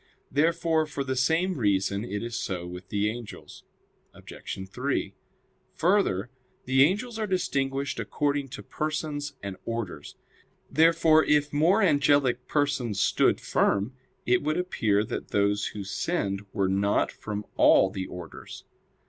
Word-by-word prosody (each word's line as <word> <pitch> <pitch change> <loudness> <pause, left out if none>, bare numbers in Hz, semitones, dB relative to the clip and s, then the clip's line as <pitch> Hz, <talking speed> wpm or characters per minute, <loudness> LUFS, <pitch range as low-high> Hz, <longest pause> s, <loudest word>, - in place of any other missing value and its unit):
Therefore 160 +2 +2
for 145 -2 -3
the 130 -1 -2
same 160 +6 +1
reason 100 -1 +1
it 105 -3 -4
is 120 0 -5
so 90 -5 -3
with 90 +2 -9
the 105 0 0
angels. 115 0 -7 0.5
Obj. 95 0 -8
3: 130 +7 -2 0.6
Further, 160 - +1 0.3
the 130 +1 +3
angels 215 - +2
are 215 - -1
distinguished 140 -7 -1
according 145 -1 -1
to 135 +1 -9
persons 155 -1 -3
and 100 -2 -5
orders. 115 -10 -5 0.6
Therefore 160 -1 +5
if 150 0 +2
more 175 +9 +3
angelic 140 -6 +3
persons 140 -8 0
stood - - +3
firm, 100 +6 +1 0.3
it 125 0 +3
would 155 +3 -1
appear 110 - +1
that - - -5
those 100 0 +1
who 105 - -6
sinned 100 - -2
were 100 -3 0
not 100 +2 +1
from 105 -1 -6
all 95 - +5
the 95 -2 -4
orders. 90 -2 -9
130 Hz, 135 wpm, -27 LUFS, 100-155 Hz, 0.6 s, Therefore